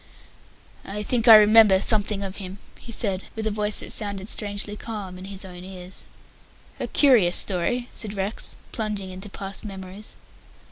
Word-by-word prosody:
"I 210 +2 -5
think 240 +2 0
I 225 - +11
remember 215 -2 +7
something 205 -1 +2
of 195 0 -6
him," 190 -1 -8 0.2
he 235 - -11
said, 200 -5 0
with 220 -1 -4
a 220 - 0
voice 210 0 +2
that - - -2
sounded 200 -1 +2
strangely 205 0 -1
calm 210 -4 -7
in 185 - -9
his 195 0 -7
own 180 -1 -10
ears. 185 -1 -8 0.7
"A - - -3
curious 235 -12 +4
story," 240 +7 0
said 210 -2 -4
Rex, 195 +3 -4
plunging 210 -4 -4
into 190 +3 -8
past 195 0 -6
memories. 195 0 -8
205 Hz, 160 wpm, -24 LUFS, 190-215 Hz, 0.7 s, I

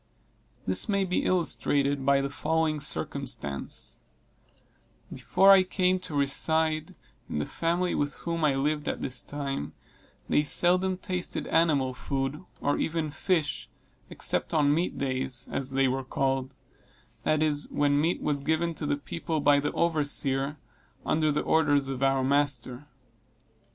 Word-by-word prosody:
This 95 - 0
may 200 -1 +2
be 180 -1 -1
illustrated 145 -5 +1
by 140 0 +3
the 140 - -2
following 160 +1 0
circumstance: 70 - -3 1.1
Before 195 +1 +4
I 195 -1 +8
came 185 0 +1
to 180 -4 -7
reside 155 +3 +1 0.3
in - - -3
the 75 - -1
family 175 +2 -1
with 145 0 -1
whom 165 -1 -3
I 145 -3 +3
lived 150 +2 -1
at - - -2
this 125 -2 -2
time, 135 - -4 0.5
they - - +3
seldom 180 +5 +3
tasted 180 -1 -4
animal 145 -6 +2
food, 135 +4 -3 0.2
or 145 - 0
even 160 -2 -1
fish, 160 -1 -1 0.4
except - - 0
on 145 -2 +4
meat 170 +4 -1
days, 130 -2 -1
as 135 -1 -2
they 135 0 +2
were 130 +1 -1
called; 135 0 -1 0.7
that 155 0 +1
is, 150 -1 0
when 145 0 +2
meat 165 +3 0
was 145 -2 -1
given 160 +3 0
to 150 -2 -4
the 145 0 0
people 160 +2 -4
by 145 0 +4
the 145 - -1
overseer, 145 -3 +1 0.5
under 155 -1 +2
the 150 - -1
orders 145 -4 +2
of 135 -1 -4
our 135 -1 +2
master. 140 -1 0
145 Hz, 145 wpm, -28 LUFS, 135-160 Hz, 1.1 s, I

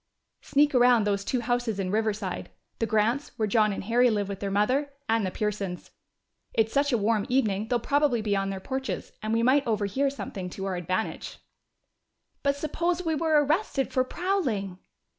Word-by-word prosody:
"Sneak 290 +1 +2
around 245 -2 +5
those 200 -1 0
two 250 +3 -1
houses 240 -3 -1
in 185 -1 -1
Riverside 215 -3 -2 0.3
the 225 - 0
Grants', 225 +6 +1
where 220 -2 +1
John 215 0 +3
and 195 - -4
Harry 240 +4 +3
live 205 -3 -1
with 195 -1 -5
their 200 - -3
mother, 255 +9 +1 0.2
and 225 -1 +2
the 190 - 0
Pearsons'! 200 -3 -3 0.6
It's 220 0 +2
such 285 0 +2
a 240 - +3
warm 215 0 +1
evening 220 -5 +1
they'll 245 0 +1
probably 285 0 +2
be 210 -2 0
on 195 0 0
their 195 -1 -4
porches, 265 +6 -4
and 215 - -3
we 230 +1 +2
might 270 +2 +3
overhear 220 +5 +1
something 195 -9 -6
to 195 +2 -6
our 190 -1 -2
advantage." 185 +4 -3 1.0
"But 280 0 +1
suppose 340 +4 -1
we 325 - +1
were 310 -1 +3
arrested 300 -3 0
for 255 - +3
prowling?" 255 - -2
225 Hz, 180 wpm, -27 LUFS, 200-275 Hz, 1.0 s, around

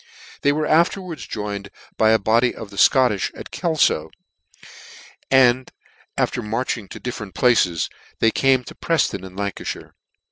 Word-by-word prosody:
They 145 - +3
were 155 +1 -1
afterwards 170 +1 0
joined 100 -2 -5 0.3
by 110 - +3
a 110 - +5
body 115 +3 +2
of 110 - -9
the 100 - -12
Scotch 125 -8 +3
at - - -10
Kelfo, 155 - +1 1.2
and 130 -1 +4 0.5
after - - 0
marching 115 -1 -3
to - - -9
different 105 -7 -6
places, 95 - +2 0.3
they 115 - +3
came 135 0 +2
to - - -10
Prefton 165 - 0
in 95 -1 -10
Lancalhire. 100 -1 -5
120 Hz, 140 wpm, -21 LUFS, 100-135 Hz, 1.2 s, a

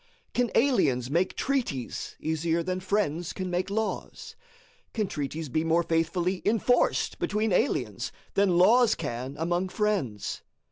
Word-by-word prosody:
Can 245 -1 +1
aliens 135 - +2
make 175 +4 +1
treaties 245 - -2
easier 160 +2 0
than 185 +1 -2
friends 185 -4 -1
can 185 -2 -4
make 180 +2 -1
laws? 220 +2 -3 0.6
Can 215 -2 +1
treaties 155 0 -4
be 155 +4 0
more 165 +1 +2
faithfully 170 +3 0
enforced 230 +3 +2
between 210 -1 0
aliens 270 - 0 0.2
than 195 -3 +3
laws 230 +6 +5
can 125 +4 -4
among 175 +4 0
friends? 185 - -1
180 Hz, 130 wpm, -27 LUFS, 160-210 Hz, 0.6 s, laws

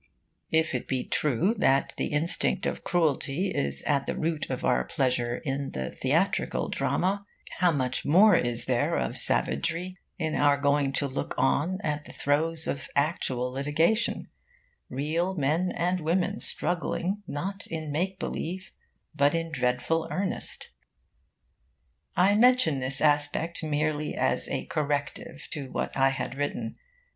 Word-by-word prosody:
If 160 -1 +2
it 125 - -3
be 130 -2 -1
true 150 - +1
that 135 -5 +3
the - - -1
instinct 165 +5 0
of - - -2
cruelty 165 +1 +1
is 70 0 -1
at 140 -2 +1
the - - -2
root 160 -1 -1
of - - -3
our 60 - +3
pleasure 125 - 0
in 135 0 -2
theatrical 65 -1 0
drama, 195 +3 0 0.4
how 180 - +5
much 130 -5 -1
more 195 +8 +6
is 120 -1 0
there - - +1
of 60 - -1
savagery 170 - 0 0.2
in 160 -4 -1
our 145 -1 +4
going 140 -1 +2
to 140 - +1
look 130 - -4
on 160 +7 +2
at 150 -1 -2
the - - -11
throes 160 +3 0
of 135 -2 -4
actual 130 -4 0
litigation 150 - +1 0.6
real 165 +7 -1
men 160 +4 +1
and 180 +2 0
women 180 +6 0
struggling 180 +3 -1
not 195 +7 -4
in 160 -2 -4
make 185 +6 -1
believe, 185 +2 -4 0.4
but 145 +2 +3
in 165 0 -2
dreadful 130 +4 0
earnest! 190 0 -3 1.4
I 190 +3 +5
mention 225 - +4
this 130 +1 -1
aspect 150 +3 +1
merely 150 0 -1
as - - 0
a - - -2
corrective 145 -1 -3
to 140 -4 -5
what - - -3
I 135 0 +4
had 135 - -3
written. 120 -6 -2
150 Hz, 140 wpm, -28 LUFS, 135-175 Hz, 1.4 s, more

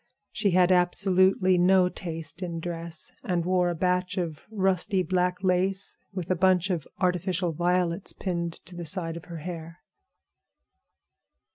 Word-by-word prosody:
She 215 -2 +1
had 180 0 +4
absolutely 185 +1 +3
no 185 0 +5
taste 165 -2 -6
in 170 -2 -3
dress, 165 -1 -4
and 175 -2 0
wore 180 -1 +2
a 175 - -2
batch 180 +2 0
of 165 -5 -3
rusty 190 -2 +1
black 180 +2 0
lace 190 +1 +1 0.2
with 185 -2 -4
a - - +3
bunch 185 +1 +3
of 165 -5 -2
artificial 180 -1 0
violets 175 +2 0
pinned 170 -3 -3
to 180 - -11
the 175 - -5
side 165 0 -2
of 170 - -8
her 170 -1 -7
hair. 170 -1 -7
180 Hz, 145 wpm, -27 LUFS, 170-185 Hz, 0.2 s, no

